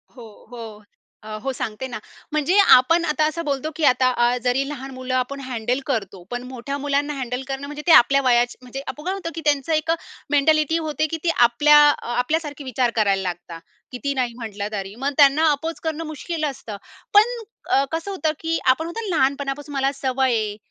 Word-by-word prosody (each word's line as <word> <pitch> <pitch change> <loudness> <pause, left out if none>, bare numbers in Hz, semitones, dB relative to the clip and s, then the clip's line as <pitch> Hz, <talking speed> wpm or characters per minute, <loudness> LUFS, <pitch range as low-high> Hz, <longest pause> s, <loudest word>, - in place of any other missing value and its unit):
हो, 245 - -11 0.3
हो. 225 -3 -9 0.4
अ, - - -12 0.2
हो, 270 - -1
सांगते 225 +1 -5
ना, 245 - -6 0.3
म्हणजे 305 +5 +1 0.2
आपण 330 +7 +3
आता 305 0 +1
असं 335 +2 -3
बोलतो, 285 +1 -2
की 320 - -4
आता 255 -1 +4
अ, 240 0 +2
जरी 255 +2 +1
लहान 270 -2 -7
मुलं 255 0 -5
आपण 255 +2 -1
हँडल 245 +1 -1
करतो. 200 -8 -3
पण 245 0 -4
मोठ्या 260 +3 -5
मुलांना 285 +1 -1
हँडल 250 -2 -4
करणं, 270 0 -4
म्हणजे 295 +1 -7
ते - - +6
आपल्या 275 0 +6
वयाची, 240 -1 +2
म्हणजे 255 +2 -7
आपण 300 +3 -7
होतं, 375 -2 -3
की 325 - -5
त्यांचं 290 +1 +1
एक 310 +1 +1 0.4
मेंटॅलिटी 310 +2 +3
होते, 310 -1 -1
की 325 - -2
ती 345 - +1
आपल्या 250 +5 +6
अ, 290 - -2
आपल्यासारखे 295 +3 -2
विचार 255 -1 0
करायला 200 -3 +2
लागतात. 175 -2 -6 0.3
किती 280 +3 -3
नाही 250 -3 -1
म्हंटलं 210 -4 -5
तरी. 195 -1 -5
मग 270 +4 -2
त्यांना 295 +2 +5
अपोज 320 +3 -3
करणं 320 0 -3
मुश्कील 310 +1 -5
असतं. 240 -7 -6 0.4
पण 415 +1 +8 0.5
अ, 275 - +4
कसं 330 +5 -3
होतं 330 -5 -1
की 325 0 -1
आपण 260 +5 +3
म्हणतो 410 +6 -5
ना, 350 - -1
लहानपणापासून 280 +1 -1
मला 270 0 +1
सवय 265 -2 0
आहे, 215 -2 -1
275 Hz, 195 wpm, -22 LUFS, 245-305 Hz, 0.5 s, पण